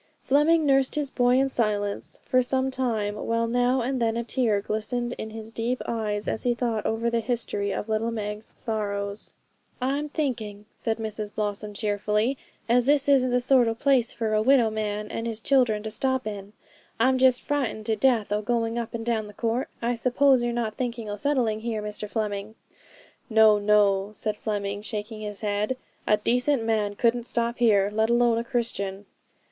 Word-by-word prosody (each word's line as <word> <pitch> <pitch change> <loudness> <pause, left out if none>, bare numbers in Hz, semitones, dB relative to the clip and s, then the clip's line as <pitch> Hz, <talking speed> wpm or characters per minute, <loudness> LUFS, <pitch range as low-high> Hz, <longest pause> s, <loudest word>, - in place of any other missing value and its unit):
Fleming 305 +3 +3
nursed 270 -2 +3
his 290 -3 -1
boy 245 0 +3
in 270 +1 +3
silence 210 -5 -2
for 255 - +3
some 260 +1 0
time, 225 -6 -1
while 230 +2 -1
now 245 +2 +2
and 255 +1 -2
then 225 0 +1
a 235 - -1
tear 230 -4 +1
glistened 240 +4 -2
in 220 - -4
his 220 0 -8
deep 235 +3 -2
eyes 210 -2 -2
as - - -1
he 245 -1 +1
thought 235 -3 -1
over 225 +1 -1
the 235 - +1
history 220 -3 -2
of 205 - -3
little 220 +1 0
Meg's 210 -1 -5
sorrows. 200 -2 -4 0.4
'I'm 280 +4 -1
thinking,' 225 -9 -3
said 225 -1 -2
Mrs 215 -1 -4
Blossom 210 0 -3
cheerfully, 210 +4 0 0.3
'as 240 +1 +3
this 285 0 +3
isn't 265 -3 +4
the 250 0 +2
sort 250 -1 +4
o' 225 - 0
place 255 -1 +2
for 220 -2 -2
a 215 - +3
widow 240 -2 +4
man 210 -1 -3
and 230 - -3
his 225 -1 -3
children 230 -4 +2
to 220 - -4
stop 260 +1 0
in. 205 -1 -6 0.5
I'm 260 +2 +3
just 255 -1 +4
frightened 265 -7 -2
to 220 -1 +1
death 230 -3 +2
o' 210 0 +1
going 230 +1 -1
up 235 0 -5
and 225 -1 -5
down 225 -3 -1
the 210 - -12
court. 235 +2 -1
I 240 +1 +1
suppose 255 +2 +3
you're 240 0 0
not 235 -2 -2
thinking 235 -3 -4
o' - - -3
settling 235 -3 0
here, 220 -2 -3
Mr 210 0 -5
Fleming?' 210 -1 -3 0.7
'No, 220 -2 +6
no,' 205 -1 +3
said 215 0 -2
Fleming, 205 -1 -3
shaking 215 +1 -5
his 210 -1 -6
head: 210 +4 -1 0.3
'a 210 - +4
decent 250 +4 +1
man 215 -2 0
couldn't 235 +2 +1
stop 235 0 -1
here, 205 -4 +4
let 220 +1 +1
alone 235 -1 +3
a - - -2
Christian.' 205 -5 -3
225 Hz, 185 wpm, -26 LUFS, 210-245 Hz, 0.7 s, No